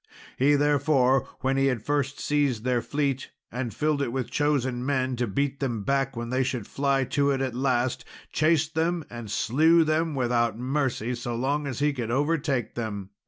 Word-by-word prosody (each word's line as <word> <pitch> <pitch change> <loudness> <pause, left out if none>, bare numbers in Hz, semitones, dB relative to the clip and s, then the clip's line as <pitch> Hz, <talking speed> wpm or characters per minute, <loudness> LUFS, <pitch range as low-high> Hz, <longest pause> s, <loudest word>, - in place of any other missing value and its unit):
He, 145 +3 +4
therefore, 140 -2 +3
when 135 +1 +1
he 135 0 +3
had 125 -5 -1
first 145 -1 -1
seized 140 -7 0
their 125 -1 +1
fleet, 140 -1 -2 0.2
and 125 -1 -3
filled 150 +1 0
it 130 -4 -1
with 125 -2 -3
chosen 130 -4 0
men, 130 -1 0
to 120 0 0
beat 140 +7 -1
them 120 -7 -2
back 135 +2 0
when 120 0 -4
they 130 +1 +1
should 125 -4 -2
fly 140 +1 +1
to 140 +2 +1
it 135 -1 +1
at 130 -2 -1
last, 125 -1 0 0.3
chased 155 0 +2
them 165 0 0
and 120 -2 -7
slew 160 +11 +4
them 155 0 0
without 120 -3 +1
mercy 125 -2 -1
so 120 0 -4
long 140 +4 -1
as 130 -4 -4
he 145 0 +1
could 120 -4 -4
overtake 140 -1 0
them. 105 -4 -5
135 Hz, 185 wpm, -26 LUFS, 120-145 Hz, 0.3 s, He